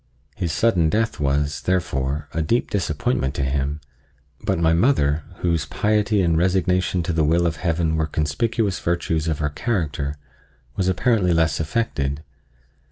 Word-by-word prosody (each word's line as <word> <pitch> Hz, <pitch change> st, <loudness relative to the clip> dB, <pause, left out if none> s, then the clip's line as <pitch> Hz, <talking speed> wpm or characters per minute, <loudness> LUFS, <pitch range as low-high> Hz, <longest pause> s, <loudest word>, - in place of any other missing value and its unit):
His 85 Hz, -3 st, -2 dB
sudden 90 Hz, -4 st, +2 dB
death 110 Hz, +5 st, 0 dB
was, 70 Hz, +1 st, 0 dB
therefore, 75 Hz, -5 st, -1 dB
a 80 Hz, -, 0 dB
deep 115 Hz, +11 st, 0 dB
disappointment 75 Hz, -7 st, -1 dB
to 70 Hz, -, -1 dB
him; 70 Hz, +2 st, -1 dB, 0.6 s
but -, -, 0 dB
my 80 Hz, 0 st, +3 dB
mother, 80 Hz, -, +2 dB, 0.2 s
whose 85 Hz, -3 st, 0 dB
piety 105 Hz, -1 st, +1 dB
and 85 Hz, -2 st, +2 dB
resignation 90 Hz, +1 st, +1 dB
to 85 Hz, -, -2 dB
the 80 Hz, -1 st, +2 dB
will 85 Hz, +3 st, +2 dB
of 80 Hz, -2 st, 0 dB
Heaven 80 Hz, -2 st, 0 dB
were 80 Hz, -1 st, 0 dB
conspicuous 100 Hz, +7 st, -1 dB
virtues 85 Hz, -2 st, -1 dB
of 80 Hz, -2 st, 0 dB
her 75 Hz, 0 st, -1 dB
character, 75 Hz, -6 st, -2 dB, 0.6 s
was 95 Hz, -2 st, 0 dB
apparently 95 Hz, -1 st, +2 dB
less 80 Hz, -2 st, +2 dB
affected. 75 Hz, -5 st, -1 dB
80 Hz, 150 wpm, -22 LUFS, 75-95 Hz, 0.6 s, my